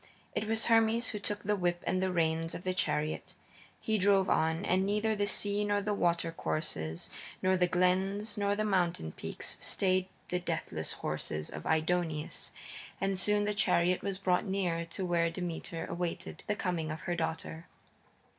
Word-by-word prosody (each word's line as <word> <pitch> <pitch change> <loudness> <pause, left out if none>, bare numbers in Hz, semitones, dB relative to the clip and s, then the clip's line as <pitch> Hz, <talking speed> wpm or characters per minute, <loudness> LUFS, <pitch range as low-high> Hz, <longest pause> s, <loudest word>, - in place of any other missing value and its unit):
It 210 - -1
was 225 0 +1
Hermes 225 0 +4
who 210 - -3
took 205 +1 -3
the 210 +1 +2
whip 175 -2 0
and 185 +1 +1
the 190 0 +1
reins 165 -1 +1
of 170 - -6
the 185 - 0
chariot. 155 -4 -1 0.4
He 220 -1 0
drove 195 0 +4
on, 160 +4 +2
and 185 +1 +3
neither 210 +2 +1
the 205 0 +1
sea 205 0 +1
nor 205 0 +2
the 210 +1 -1
water 170 -3 +1
courses, 85 - -3 0.3
nor 185 0 +4
the 180 -1 +3
glens 190 +4 +1
nor 205 0 +1
the 215 +1 0
mountain 175 - +1
peaks - - -4
stayed 185 -1 +2 0.2
the 180 - 0
deathless 180 - -3
horses 75 0 -3
of 75 - -6
Aidoneus, 160 -1 0 0.5
and 195 0 +1
soon 205 +2 +3
the 210 - +1
chariot 180 -3 +3
was 195 -1 -2
brought 185 -1 +2
near 180 -4 0
to 190 +2 -4
where 170 -1 +2
Demeter 165 -1 -4
awaited 175 0 -4
the 210 - +1
coming 175 -6 -1
of 155 +1 -4
her 175 - -1
daughter. 160 0 -3
185 Hz, 175 wpm, -32 LUFS, 170-205 Hz, 0.5 s, Hermes